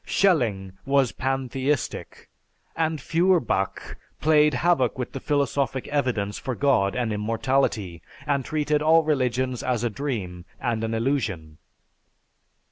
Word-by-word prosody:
Schelling 115 - +1
was 135 -3 +2
pantheistic, 135 +1 -2 0.5
and 160 -1 0
Feuerbach 165 - 0 0.2
played 150 -1 +4
havoc 130 -4 +2
with 125 -2 -4
the 135 - -5
philosophic 140 -2 -1
evidence 120 -8 -1
for 130 -2 -4
God 115 -9 +2
and 120 -3 -1
immortality 105 -4 -1 0.2
and 140 -2 0
treated 150 +2 0
all 160 +1 +5
religions 130 -4 0
as 120 -3 -1
a 120 - 0
dream 105 -10 -4 0.2
and 115 -3 -1
an 115 0 -1
illusion. 110 - -2
130 Hz, 120 wpm, -25 LUFS, 115-145 Hz, 0.5 s, all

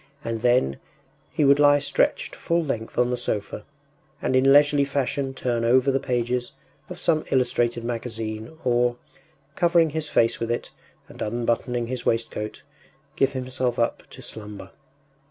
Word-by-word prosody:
And 115 -1 -3
then, 120 - +2 0.5
he 150 - +1
would 140 +1 +5
lie 145 0 +6
stretched 145 - 0
full 170 0 0
length 115 -7 -4
on 125 0 +2
the 125 - 0
sofa, 105 -4 -3 0.5
and 130 - 0
in 135 +1 +5
leisurely 145 0 +5
fashion 140 -1 -2
turn 120 -3 -1
over 130 +3 +4
the 135 - +1
pages 125 0 -2 0.4
of 180 - -7
some 160 -3 +1
illustrated 120 -2 +1
magazine, 115 +2 -5
or, 120 -1 +2 0.6
covering 170 -3 +3
his 155 0 -2
face 115 -3 +2
with 115 - -3
it 120 - -3 0.4
and - - -13
unbuttoning 120 +2 -1
his 125 +1 -4
waistcoat, 110 -2 -2 0.5
give 135 0 +2
himself 130 -1 -2
up 115 - -1
to - - -12
slumber. 105 -3 -7
125 Hz, 150 wpm, -24 LUFS, 115-140 Hz, 0.6 s, lie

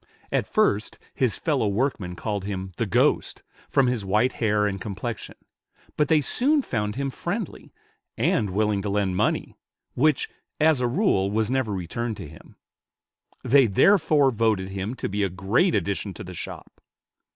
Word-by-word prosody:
At - - 0
first 110 - +1 0.2
his 125 -6 0
fellow 140 -9 0
workmen 100 -4 -1
called 105 0 -3
him 95 -1 -4
"the 115 - -1
ghost," 95 - +1 0.3
from 135 - +3
his 125 -4 0
white 105 +6 +2
hair 105 -3 +1
and 100 -2 -2
complexion; 110 +3 -5 0.6
but 150 - +2
they 155 0 +4
soon 275 - +2
found 105 - -2
him 135 0 -2
friendly, - - -5 0.5
and 105 - +1
willing 105 +1 +1
to 105 - -3
lend 100 -2 0
money, - - 0 0.4
which, 150 +1 +2 0.3
as 155 -4 +4
a 125 - +2
rule, 120 - +2
was 110 +2 0
never 130 -5 0
returned 105 +5 -3
to 95 - -7
him; 75 +1 -15 0.9
they 135 -1 +5
therefore 150 - +4
voted 110 -5 0
him 95 +5 -4
to - - -3
be 100 +1 -2
a 100 - +1
great 100 - +1
addition 100 -1 -2
to - - -7
the 90 - -9
shop. - - -9
110 Hz, 160 wpm, -25 LUFS, 100-130 Hz, 0.9 s, they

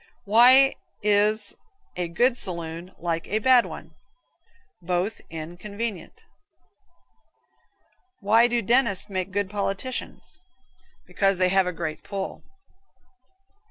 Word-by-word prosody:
Why 250 +6 +6 0.3
is 210 +1 +2 0.4
a 180 -1 -2
good 235 +9 +1
saloon 170 -3 -5
like 165 -1 -3
a 210 - -1
bad 245 +2 +4
one? - - -10 0.9
Both 180 +5 -2
inn 165 +1 -8
convenient 210 +1 -7 1.9
Why 225 +3 +4
do 240 -1 -1
dentists 230 -3 +3
make 185 0 -3
good 200 +1 -2
politicians? 205 +5 -5 0.6
Because 195 -1 0
they 185 0 +2
have 190 0 +2
a - - -1
great 155 -2 -5
pull. 195 -1 -6
200 Hz, 105 wpm, -24 LUFS, 180-225 Hz, 1.9 s, Why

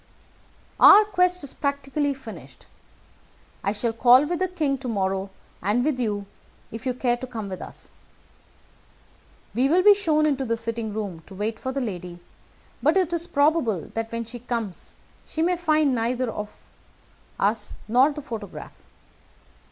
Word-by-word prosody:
"Our 420 +1 +9
quest 360 -4 +1
is 280 - -5
practically 280 0 -1
finished. 180 - -12 1.0
I 200 - +1
shall 225 +2 -1
call 245 +4 +6
with 345 +2 -2
the 370 - +1
king 300 -7 -1
to 260 - -6
morrow, 195 -3 -1 0.3
and 215 +7 +1
with 295 -4 0
you, 205 -4 -1 0.5
if 225 +3 -6
you 250 - 0
care 245 -1 +1
to 255 +1 -7
come 220 -5 -6
with 185 - -6
us. - - -10 1.6
We 260 +3 +2
will 360 +4 +4
be 415 +1 +9
shown 315 -7 +1
into 275 -3 +1
the 230 -2 -1
sitting 230 -1 -3
room 200 -6 -5
to 195 - -11
wait 215 +3 -3
for 260 - -3
the 275 +1 -2
lady, 180 -6 -5 0.6
but - - +3
it 360 -3 +1
is 340 0 -1
probable 285 - +1
that 225 0 -3
when 230 0 -3
she 235 +2 -9
comes 230 -6 -5 0.3
she 320 - -2
may 360 +1 +2
find 310 -5 +2
neither 240 +1 -1 1.1
us 210 +1 0
nor 255 +6 +4
the 295 0 -7
photograph. 225 -6 -7
245 Hz, 160 wpm, -24 LUFS, 220-300 Hz, 1.6 s, Our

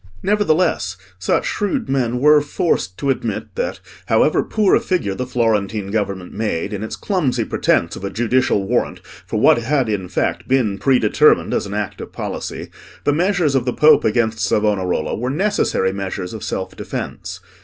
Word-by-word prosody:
Nevertheless 180 - +1 0.2
such 95 - +1
shrewd 225 +4 -1
men 125 -3 0
were 150 +2 +6
forced 145 - -1
to 140 - 0
admit - - -4
that, - - -3 0.3
however - - +3
poor 210 -3 +1
a - - +6
figure 175 - -1
the 125 +5 -4
Florentine 110 -4 0
government 100 -4 -2
made 105 -2 -2
in 100 - -4
its 110 - -4
clumsy 135 - -1
pretence 85 - +1
of - - -9
a 100 - -2
judicial 115 -2 +1
warrant - - -1
for - - -6
what - - +5
had 130 +2 0
in 95 -4 -2
fact - - -1
been 115 -7 +1
predetermined 125 -6 +3
as - - -1
an 100 - -5
act 105 -2 -3
of - - -8
policy, - - -5 0.3
the 145 - +2
measures 175 -2 +1
of 130 -3 +1
the 125 - 0
Pope 155 +1 +5
against 110 0 +1
Savonarola 100 -5 0
were 125 +4 -2
necessary 145 - 0
measures 95 -1 -4
of 110 - -7
self 95 - -4
defence. 90 +1 -6
115 Hz, 170 wpm, -19 LUFS, 100-145 Hz, 0.3 s, were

